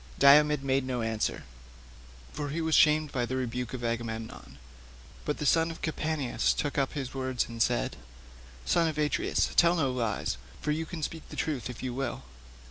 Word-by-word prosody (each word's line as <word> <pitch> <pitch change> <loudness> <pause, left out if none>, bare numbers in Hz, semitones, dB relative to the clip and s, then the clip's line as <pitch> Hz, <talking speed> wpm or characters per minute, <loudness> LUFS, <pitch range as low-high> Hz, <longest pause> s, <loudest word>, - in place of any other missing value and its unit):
Diomed 150 +1 +6
made 135 0 +1
no 125 -2 -2
answer, 110 -1 -1 0.9
for 145 -1 -3
he 155 +4 -3
was 160 -1 0
shamed 155 -1 +5
by 125 -3 -1
the 130 +2 -2
rebuke 125 -1 -3
of 120 - -7
Agamemnon; 115 -1 -4 0.7
but 150 - -1
the 150 - -3
son 165 +3 +4
of 165 - -9
Capaneus 155 -4 0
took 145 - -2
up 135 -2 0
his 135 -4 -4
words 130 -2 -1
and 115 -1 -6
said, - - +1 0.7
"Son 165 - +3
of 155 - -3
Atreus, 150 -1 +1
tell 170 0 +5
no 140 -6 +1
lies, 115 - -1 0.2
for 150 - -1
you 160 +1 -2
can 165 -3 -6
speak 160 +1 -5
truth 135 -7 -3
if 125 - -8
you 125 -1 -2
will. 135 +2 -3
135 Hz, 180 wpm, -29 LUFS, 125-155 Hz, 0.9 s, Diomed